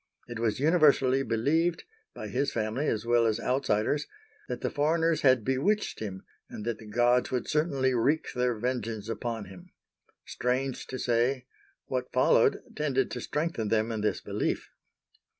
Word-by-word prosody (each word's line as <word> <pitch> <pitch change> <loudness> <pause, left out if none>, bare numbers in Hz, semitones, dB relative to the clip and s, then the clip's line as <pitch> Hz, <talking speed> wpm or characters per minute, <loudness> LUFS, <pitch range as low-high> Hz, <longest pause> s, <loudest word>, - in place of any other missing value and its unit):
It 120 -2 -6
was 115 -1 0
universally 145 -4 +4
believed,—by 165 - -2
his 140 - 0
family 115 +6 -1
as 110 0 -1
well 120 -1 +3
as 110 0 0
outsiders—that 140 - -2
the - - -1
foreigners 160 +2 +1
had 130 -5 +4
bewitched 160 +12 0
him 95 -3 -6 0.3
and 105 - -7
that 115 -2 -2
the 110 - -12
gods 120 +3 +2
would 125 -1 -2
certainly 140 -4 +1
wreak 140 +6 +1
their 125 -1 +1
vengeance 115 -2 -3
upon 115 -1 -3
him. 95 0 -13 0.6
Strange 130 +1 -2
to 130 - -5
say, 125 +2 +1 0.4
what 125 -1 -3
followed, - - +3
tended 135 -4 0
to 125 - -4
strengthen 150 -7 -2
them 110 +2 +1
in 110 -2 -3
this 105 - 0
belief. - - -2
125 Hz, 150 wpm, -28 LUFS, 115-145 Hz, 0.6 s, universally